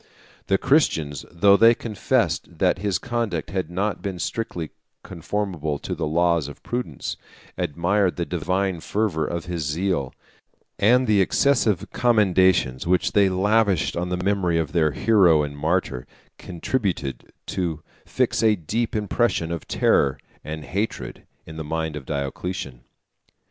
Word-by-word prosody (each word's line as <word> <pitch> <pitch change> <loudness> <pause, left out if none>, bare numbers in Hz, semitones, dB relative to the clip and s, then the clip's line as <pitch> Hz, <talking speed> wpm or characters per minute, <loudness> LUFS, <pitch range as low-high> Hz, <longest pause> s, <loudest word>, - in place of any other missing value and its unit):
The 95 - +3
Christians, 80 - +1
though 100 +3 +5
they 115 +3 +6
confessed 110 -4 -1
that - - +2
his 100 -2 0
conduct 115 -7 -3
had 95 -4 -2
not 100 +4 -2
been 95 -3 -4
strictly 90 -5 -4 0.3
conformable 85 -4 -3
to - - -5
the - - -2
laws 85 -1 +2
of 75 - -11
prudence, 120 - -4 0.4
admired 90 +5 0
the 85 - -2
divine 90 +2 -1
fervor 90 -4 -1
of 85 -1 -4
his 90 -2 -3
zeal; 75 -2 -1 0.6
and 125 +5 +4
the 105 -4 +3
excessive 110 -2 +2
commendations 95 - +3
which 90 +1 +2
they 100 -2 +4
lavished 100 -1 +2
on 90 +1 -2
the 90 - -1
memory 90 -3 +1
of 80 -2 -1
their 80 -3 +2
hero 85 -3 +4
and 70 -1 -5
martyr, 75 -4 -1 0.3
contributed 90 - -3
to 85 -5 -3 0.2
fix - - 0
a 110 -2 +4
deep 110 +7 -2
impression 105 -5 0
of 85 - -5
terror 70 -1 +2 0.3
and 75 -1 -6
hatred 105 +4 -4 0.2
in 80 0 -10
the 80 - -4
mind 80 0 -3
of 70 -3 -8
Diocletian. 70 -2 -4
90 Hz, 140 wpm, -23 LUFS, 80-105 Hz, 0.6 s, they